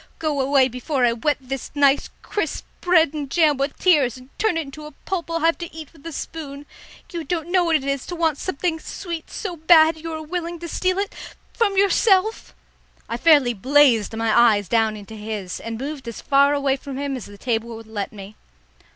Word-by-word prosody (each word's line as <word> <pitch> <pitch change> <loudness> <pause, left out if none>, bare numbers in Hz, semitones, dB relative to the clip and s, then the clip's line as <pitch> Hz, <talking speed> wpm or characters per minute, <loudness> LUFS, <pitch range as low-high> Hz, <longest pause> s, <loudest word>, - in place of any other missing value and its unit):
Go 305 -4 -1
away 265 -1 +4
before 255 +1 -1
I 235 - +3
wet 290 +6 0
this 270 0 -6
nice 280 -1 +3
crisp 370 -7 -3 0.2
bread 330 -4 +4
and 290 -3 -4
jam 310 -2 +3
with 275 +1 -2
tears, 285 -10 +3
and 255 +2 -16
turn 435 -6 +1
it - - +1
into 300 +1 -9
a 300 - -12
pulp 355 -4 -3
I'll 330 0 -1
have 330 +1 +2
to 340 -1 -6
eat 315 -1 -10
with 305 -4 -19
a - - -5
spoon. 290 -1 -7 0.5
You 335 -1 -3
don't 340 0 -3
know 365 -1 +4
what 330 -1 +2
it 295 - +1
is 275 -1 -2
to 355 - -5
want 325 -4 0
something 340 -1 -2
sweet 335 0 -6
so 385 -5 -5
bad 320 0 +5
you 330 +1 -6
are 315 -1 -5
willing 340 +1 -4
to 340 +1 -7
steal 370 +2 0
it 400 0 -2 0.4
from 405 -5 +1
yourself!" 400 +1 +2 0.5
I 230 - -3
fairly 285 -3 +5
blazed 240 -1 +3
my 225 -1 +1
eyes 220 -5 +4
down 220 +1 +1
into 205 +1 -11
his, 210 -3 -5
and 230 0 -5
moved 275 0 -6
as 230 - -6
far 280 +1 +3
away 275 -1 +1
from 275 0 -7
him 280 -1 -2
as 250 - -7
the 205 - -12
table 230 0 -2
would 225 0 -10
let 215 -2 -4
me. 200 0 -11
290 Hz, 210 wpm, -22 LUFS, 250-330 Hz, 0.5 s, bad